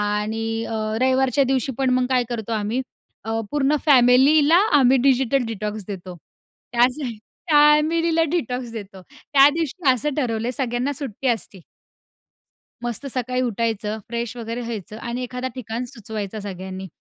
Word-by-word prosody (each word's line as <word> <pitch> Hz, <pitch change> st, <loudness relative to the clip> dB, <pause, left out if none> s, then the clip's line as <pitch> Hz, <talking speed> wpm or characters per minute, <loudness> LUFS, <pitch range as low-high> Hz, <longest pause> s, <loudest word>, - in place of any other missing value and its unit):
आणि 220 Hz, +2 st, -1 dB
अ, 225 Hz, -, -5 dB, 0.3 s
रविवारच्या 260 Hz, +1 st, +3 dB
दिवशी 265 Hz, 0 st, 0 dB
पण 265 Hz, -1 st, +2 dB
मग 255 Hz, 0 st, +2 dB
काय 250 Hz, -1 st, +2 dB
करतो 230 Hz, -2 st, -4 dB
आम्ही 220 Hz, +3 st, -1 dB, 0.4 s
अ, 225 Hz, +1 st, -1 dB
पूर्ण 295 Hz, 0 st, +2 dB
फॅमिलीला 285 Hz, +4 st, +6 dB, 0.2 s
आम्ही 260 Hz, 0 st, +5 dB
डिजिटल 265 Hz, 0 st, +2 dB
डिटॉक्स 210 Hz, -1 st, -4 dB
देतो. 185 Hz, -2 st, -7 dB, 0.6 s
त्याचं 250 Hz, +3 st, +2 dB, 0.4 s
फॅमिलीला 310 Hz, +3 st, +4 dB
डिटॉक्स 255 Hz, -8 st, -2 dB
देतो. 200 Hz, -4 st, -8 dB
त्या 280 Hz, -2 st, +4 dB
दिवशी 325 Hz, -1 st, -2 dB
असं 270 Hz, +3 st, 0 dB
ठरवलंय 235 Hz, -4 st, -1 dB
सगळ्यांना 250 Hz, +1 st, -1 dB
सुट्टी 265 Hz, -1 st, -4 dB
असते. 220 Hz, -4 st, -2 dB, 1.2 s
मस्त 240 Hz, +3 st, -3 dB
सकाळी 255 Hz, 0 st, -1 dB
उठायचं, 220 Hz, -3 st, -1 dB
फ्रेश 235 Hz, 0 st, -3 dB
वगैरे 230 Hz, +1 st, -4 dB
व्हायचं 220 Hz, -3 st, -6 dB
आणि 240 Hz, +1 st, -4 dB
एखादा 250 Hz, +1 st, -4 dB
ठिकाण 235 Hz, -1 st, -4 dB
सुचवायचा 220 Hz, -4 st, -6 dB
सगळ्यांनी. 190 Hz, -1 st, -7 dB
245 Hz, 135 wpm, -22 LUFS, 220-270 Hz, 1.2 s, फॅमिलीला